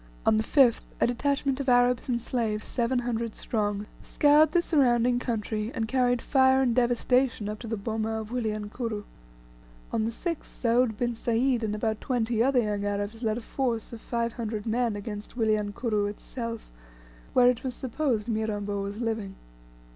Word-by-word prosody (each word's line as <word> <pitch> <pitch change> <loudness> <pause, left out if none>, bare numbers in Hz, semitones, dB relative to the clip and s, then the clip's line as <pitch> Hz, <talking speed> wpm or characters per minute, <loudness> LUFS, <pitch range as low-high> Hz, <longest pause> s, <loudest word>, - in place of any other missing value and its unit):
On 215 - +4
the 220 - +1
5th, 250 -1 +4 0.2
a - - +4
detachment 275 +2 0
of 275 -1 -1
Arabs 245 0 +3
and 240 -1 +1
slaves, 225 -3 -2
seven 245 +1 0
hundred 235 -2 -2
strong, 205 -2 -2 0.2
scoured 295 +1 +4
the 345 - +4
surrounding 250 -7 +3
country, 220 -2 -2
and 225 -1 -1
carried 245 -1 +1
fire 265 -1 +4
and 255 -3 +2
devastation 245 -1 +2
up 210 0 -4
to 235 - -7
the 225 0 -2
boma 220 +1 -2
of 220 0 -7
Wilyankuru. 215 -1 -3 0.9
On 220 - 0
the 225 - 0
6th, 335 +7 -4
Soud 235 -2 +1
bin 240 +1 0
Sayd 235 +2 +1
and 210 -1 -1
about 220 0 -1
twenty 235 -3 0
other 265 +2 +3
young 205 -1 -2
Arabs 205 +2 -3
led 220 -2 0
a - - -5
force 235 -2 -2
of 225 - -8
five 235 -1 -2
hundred 220 -3 -4
men 230 -1 0
against 205 +2 -7
Wilyankuru 215 -1 0
itself, 230 +2 -6 0.6
where 250 -1 +6
it 240 - -6
was 255 -2 -3
supposed 250 -4 -1
Mirambo 205 -3 -2
was 200 +2 -5
living. 220 -4 -2
230 Hz, 170 wpm, -27 LUFS, 215-250 Hz, 0.9 s, where